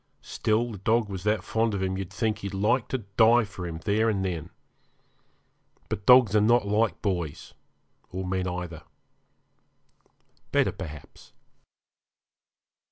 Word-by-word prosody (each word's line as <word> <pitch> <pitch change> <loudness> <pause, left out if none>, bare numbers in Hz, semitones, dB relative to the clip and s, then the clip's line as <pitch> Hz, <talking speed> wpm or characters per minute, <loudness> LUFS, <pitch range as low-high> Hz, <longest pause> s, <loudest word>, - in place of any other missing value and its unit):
Still 115 +2 0
the 105 - -8
dog 110 +2 +1
was 95 -2 -6
that 105 +1 +1
fond 115 -1 0
of 95 - -2
him 95 0 -1
you'd 95 -1 -5
think 110 +1 -1
he'd 100 0 -5
like 115 +5 +1
to 130 -6 -4
die 115 +1 +6
for 95 -3 -7
him 80 -1 -5
there 110 +2 +2
and 95 -3 -1
then. 85 -4 -4 1.4
But 95 - -5
dogs 125 -5 +7
are 105 - +5
not 120 +1 +4
like 105 +2 +1
boys, 85 -7 -3 0.6
or 95 +1 -5
men 95 0 -1
either 90 -3 -5 1.7
better, - - +2
perhaps. 80 -5 -10
100 Hz, 140 wpm, -26 LUFS, 95-110 Hz, 1.7 s, dogs